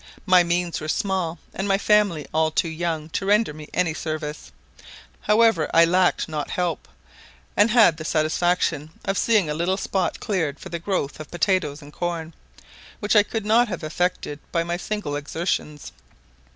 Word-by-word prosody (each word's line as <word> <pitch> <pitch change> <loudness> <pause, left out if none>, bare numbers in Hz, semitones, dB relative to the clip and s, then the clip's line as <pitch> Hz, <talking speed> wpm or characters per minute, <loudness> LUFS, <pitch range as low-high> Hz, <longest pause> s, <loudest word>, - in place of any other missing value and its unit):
My 185 -1 +6
means 175 -1 -1
were 155 - -5
small, 185 -1 -1 0.2
and 190 +2 -3
my 195 0 +3
family 205 -7 +2
all 160 0 +2
too 160 - 0
young 160 -1 -3
to 180 - -3
render 205 -3 +2
me 150 0 -11
any 175 -3 0
service; 155 -1 -5 0.7
however, 215 -6 +3
I 165 0 +8
lacked 180 +1 +2
not 155 -2 -4
help, 175 -3 -2 0.7
and 205 +2 +4
had 220 -8 +5
the 155 - -6
satisfaction 155 0 0 0.2
of 195 - 0
seeing 210 -4 +3
a 150 - -1
little 175 +5 0
spot 190 -3 -1
cleared 165 -9 -2
for - - -9
the 170 - -4
growth 165 -6 -2
of 155 - -8
potatoes 175 -4 0
and 145 +1 -13
corn, 170 -2 -4 0.7
which 205 0 0
I 210 - +8
could 220 0 -4
not 230 +3 +4
have 180 -7 -5
effected 155 -2 -2
by 170 - +1
my 170 +1 -2
single 190 -5 -4
exertions. 150 0 -3
175 Hz, 170 wpm, -23 LUFS, 155-195 Hz, 0.7 s, I